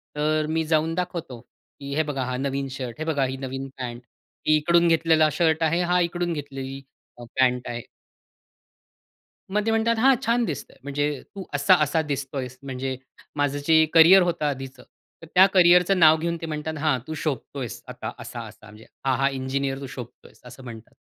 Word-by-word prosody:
तर 155 +1 +1
अ, - - -5
मी 160 +1 0
जाऊन 160 +1 +1
दाखवतो, 170 -8 -4 0.4
की 140 0 -6
"हे 160 - +2
बघा, 145 -3 -3
हा 125 0 -3
नवीन 135 +1 -2
शर्ट, 130 -3 -6
हे 155 - -3
बघा 150 -4 0
ही 130 +1 -4
नवीन 135 0 -5
पॅन्ट, 120 -2 -6 0.4
ही 155 - +5
इकडून 170 +3 +3
घेतलेला 160 -1 +4
शर्ट 160 +1 +1
आहे, 165 +2 +2
हा 180 0 +2
इकडून 175 0 -1
घेतलेली 135 -2 -6 0.4
अ, 120 - -10 0.2
पॅन्ट 125 -1 +2
आहे." 120 0 -4 1.7
मग 210 0 +1
ते 225 - +1
म्हणतात, 225 +1 +2
"हां, 265 +3 +5
छान 235 +1 +2
दिसतं 155 -8 -6
आहे." - - -24
म्हणजे 145 0 -2
तू 195 - -6
असा-असा 150 +2 +3
दिसत 140 0 -4
आहेस, 130 -2 -5
म्हणजे 130 -1 -4 0.5
माझं 145 0 0
जे 160 -1 +6
करिअर 170 +4 +8
होतं 175 -3 -1
आधीचं, 135 -2 -4 0.4
तर 165 - -11
त्या 185 +1 +9
करिअरचं 180 +1 +5
नाव 160 -1 +7
घेऊन, 170 +1 -2
ते - - -4
म्हणतात, 155 0 -4
"हां, 150 -3 +1
तू 155 - -4
शोभत 145 -2 -3
आहेस 125 -4 -5
आता - - -6
असा-असा." - - -9
म्हणजे, 105 +1 -15 0.2
"हा, 135 -1 +2
हा, 135 +2 +2
इंजिनिअर 135 +1 -2
तू 140 - -7
शोभत 125 -1 -10
आहेस," - - -18
असं 125 +1 -12
म्हणतात. 115 -2 -11
150 Hz, 190 wpm, -24 LUFS, 135-165 Hz, 1.7 s, त्या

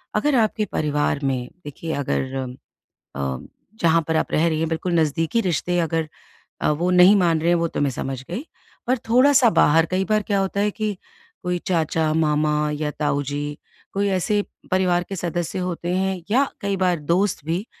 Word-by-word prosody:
अगर 290 -2 +2
आपके 220 -2 +2
परिवार 145 -1 0
में, 130 -2 -1 0.2
देखिए, 160 +3 -5
अगर 135 -1 -2 0.8
अ, 65 -2 -2 0.4
जहाँ 165 0 +4
पर 160 - +1
आप - - 0
रह 160 +2 +3
रही 155 -1 -1
हैं, 165 - 0
बिल्कुल 165 +2 -2
नज़दीकी 160 +8 +1
रिश्ते 180 -2 0
अगर 165 -2 0 0.5
अ, - - +2
वो 170 +4 0
नहीं 180 +3 +7
मान 170 -5 +3
रहे 170 - +1
हैं, 175 - +4
वो 170 0 +1
तो 160 - -3
मैं 145 - +2
समझ 130 0 -4
गई। 230 - -4 0.4
पर 255 +1 +2
थोड़ा-सा 255 0 +5
बाहर 165 -4 +4
कई 185 +1 +1
बार 215 0 +3
क्या 200 -1 +2
होता 195 +1 -1
है 210 0 +2
कि 215 -2 -3 0.5
कोई 180 0 0
चाचा-मामा 155 -2 +1
या 150 0 -2
ताऊ 145 -1 +1
जी, 145 +1 -4 0.4
कोई 200 +1 +1
ऐसे 195 +2 +1 0.3
परिवार 180 -2 +2
के 195 - -4
सदस्य 175 0 -3
होते 175 -1 -3
हैं 190 -1 -1
या 270 +3 +4
कई 200 -1 -1
बार 180 -3 +1
दोस्त 175 +3 0
भी, 170 +6 -2
170 Hz, 180 wpm, -22 LUFS, 150-190 Hz, 0.8 s, नहीं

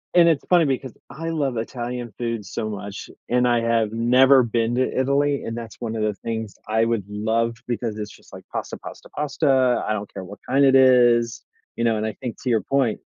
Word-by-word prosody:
And, 170 -1 +7
it's 160 -4 +2
funny, 175 -3 +5
because 130 -3 -2 0.2
I 165 +4 -5
love 140 -6 -1
Italian 120 0 -4
food 115 -3 -3
so 110 - -4
much, 100 -1 -7 0.2
and 125 0 +3
I 120 -1 +2
have 115 -2 +1
never 125 +4 +5
been 115 0 0
to 130 +1 0
Italy, 140 +2 +1
and 115 - -4
that's 115 -2 -7
one 115 -2 -4
of 110 - -2
the 105 -1 0
things 110 -2 -4
I 110 +1 +2
would 115 -4 0
love, 110 +3 -1
because 115 -2 -3
it's 105 0 -4
just - - -20
like - - -10
pasta, - - -4
pasta, - - -11
pasta, 135 -4 +2
I 110 - +1
don't 105 -1 -5
care 95 - -7
what 100 +3 -11
kind 140 +2 +4
it 135 - +5
is, 120 -3 +4 0.3
you 115 - -2
know, 115 -1 +2
and, 110 - -2
I 110 - -3
think 120 -4 -6
to 130 - -1
your 110 -3 +2
point 130 -1 0
120 Hz, 220 wpm, -23 LUFS, 110-130 Hz, 0.3 s, And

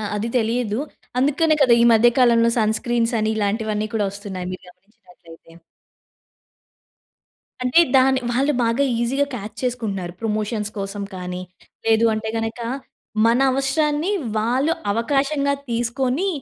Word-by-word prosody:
ఆ! - - -4
అది 220 +3 -2
తెలియదు. 230 -1 0 0.4
అందుకనే 305 +4 +3
కదా! 245 - +5
ఈ - - +5
మధ్య 235 +2 +5
కాలంలో 235 -2 +4
సన్ 220 0 +2
స్క్రీన్స్ 240 -1 0
అని 215 0 0
ఇలాంటివన్నీ 215 0 -1
కూడా 210 -2 +1
వస్తున్నాయి. 195 -2 -7
మీరు 185 - -8
గమనించినట్లయితే. 180 -4 -19 2.1
అంటే 250 +7 +4 0.2
దాన్ని 260 0 +4
వాళ్ళు 275 +4 +2
బాగా 230 +5 +1 0.2
ఈజిగా 270 +4 +1
కాచ్ 210 -2 -7
చేసుకుంటున్నారు. 210 -8 -3
ప్రమోషన్స్ 215 -1 -2
కోసం 200 +1 -4
కానీ 180 0 -5 0.4
లేదు 225 0 +4
అంటే 220 0 -4
గనక, 225 +2 -4 0.7
మన 235 +2 +3
అవసరాన్ని 295 +5 0 0.3
వాళ్ళు 255 +8 +1 0.2
అవకాశంగా 280 +5 +1 0.2
తీసుకొని 250 +8 -1
230 Hz, 125 wpm, -21 LUFS, 210-260 Hz, 2.1 s, కదా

